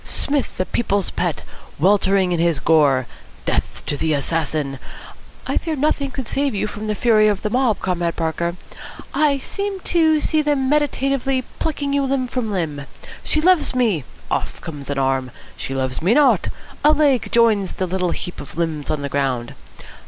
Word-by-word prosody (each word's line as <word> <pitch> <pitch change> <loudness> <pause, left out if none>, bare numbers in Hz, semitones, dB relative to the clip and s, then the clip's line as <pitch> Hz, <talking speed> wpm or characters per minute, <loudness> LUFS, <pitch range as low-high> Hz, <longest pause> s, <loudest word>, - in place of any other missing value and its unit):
Psmith, 285 -2 -1
the 185 - 0
People's 200 -4 0
Pet, - - -2 0.3
weltering 190 +1 +3
in 175 - 0
his 170 -2 +2
gore? 140 -4 +3 0.4
Death - - -2
to - - -1
the 155 +1 0
assassin! 145 -2 -1 0.7
I - - 0
fear 320 -2 -2
nothing 280 -1 0
could 265 -2 -6
save 280 -4 0
you 200 - 0
from 215 0 -6
the 210 - 0
fury 215 -2 +4
of 205 -2 0
the 210 - -1
mob, 250 -3 +2
Comrade 175 -2 -1
Parker. 170 +1 -1 0.6
I 295 -2 +3
seem 400 +8 -4
to 320 -3 +3
see 310 +1 +1
them 290 -3 +1
meditatively 275 -2 +1 0.2
plucking 285 -3 -1
you 280 - +2
limb 270 -1 0
from 245 -3 -3
limb. 150 -7 -3 0.4
'She 310 - +1
loves 335 -6 +4
me!' 220 - +2 0.3
Off - - -2
comes 145 -4 -8
an 145 - -2
arm. 135 -1 0 0.3
'She 135 - -5
loves 130 +1 -2
me 190 +8 +3
not.' 295 -1 +4 0.4
A 300 - +6
leg 285 -5 +2
joins 220 -5 +3
the 185 - -2
little 180 0 -1
heap 175 - -5
of 145 - -11
limbs 160 -4 -2
on 150 -2 -1
the 140 - -2
ground. 135 -4 -1
205 Hz, 175 wpm, -21 LUFS, -, 0.7 s, A